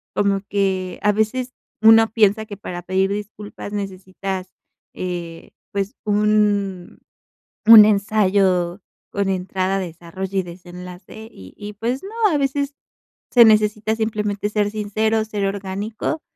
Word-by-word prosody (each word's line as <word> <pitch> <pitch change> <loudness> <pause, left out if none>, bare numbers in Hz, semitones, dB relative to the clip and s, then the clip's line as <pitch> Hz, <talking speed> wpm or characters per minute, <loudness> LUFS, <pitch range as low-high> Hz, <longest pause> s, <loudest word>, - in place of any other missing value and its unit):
como 200 -1 +1
que 190 -2 -1
a 210 - +4
veces 245 +5 -1 0.3
uno 225 0 +6
piensa 220 -1 +2
que 205 - -8
para 180 -3 -7
pedir 190 +2 0
disculpas 205 0 -7
necesitas, 190 -1 -5 0.4
eh, 175 -2 -6 0.2
pues 200 +2 -2
un 205 -3 +1 0.7
un 220 -2 +11
ensayo 195 -3 +2 0.3
con 200 -1 -1
entrada, 190 +1 -1
desarrollo 185 +2 -5
y - - +2
desenlace 180 +4 -11
y 95 -1 -14
y 210 0 -8
pues 240 +5 -3
no, 390 - -8 0.2
a 300 - +2
veces 280 +1 -1 0.6
se 240 -2 +7
necesita 215 0 +3
simplemente 210 -2 -2
ser 210 -1 0
sincero, 215 +1 0
ser 210 -2 -3
orgánico, 200 +9 -4
205 Hz, 125 wpm, -21 LUFS, 190-215 Hz, 0.7 s, un